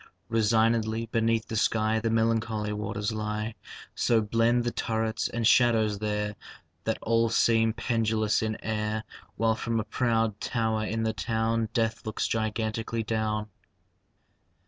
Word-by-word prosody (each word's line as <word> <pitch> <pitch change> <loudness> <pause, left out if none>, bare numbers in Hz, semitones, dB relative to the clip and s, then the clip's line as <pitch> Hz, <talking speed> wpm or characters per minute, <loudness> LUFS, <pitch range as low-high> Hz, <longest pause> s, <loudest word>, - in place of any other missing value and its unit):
Resignedly 115 0 +2
beneath 115 -1 0
the 110 - -4
sky 110 0 +2
The 115 0 -1
melancholy 110 -1 0
waters 105 +1 -3
lie. 105 0 -3 0.4
So 115 -2 +2
blend 115 +3 +2
the 120 - -1
turrets 110 -1 -1
and 115 -1 -2
shadows 110 -4 +4
there 105 0 -2 0.5
That - - 0
all 115 0 +2
seem 115 0 +3
pendulous 110 -2 +1
in 110 -1 -2
air, 110 0 -2 0.3
While 115 0 +2
from 115 +1 -1
a - - -1
proud 115 -1 0
tower 110 -2 -1
in 110 +1 -2
the 110 0 0
town 115 0 0
Death 115 -1 0
looks 110 - -2
gigantically 110 +1 -2
down. 110 -1 -1
110 Hz, 135 wpm, -28 LUFS, 110-115 Hz, 0.5 s, shadows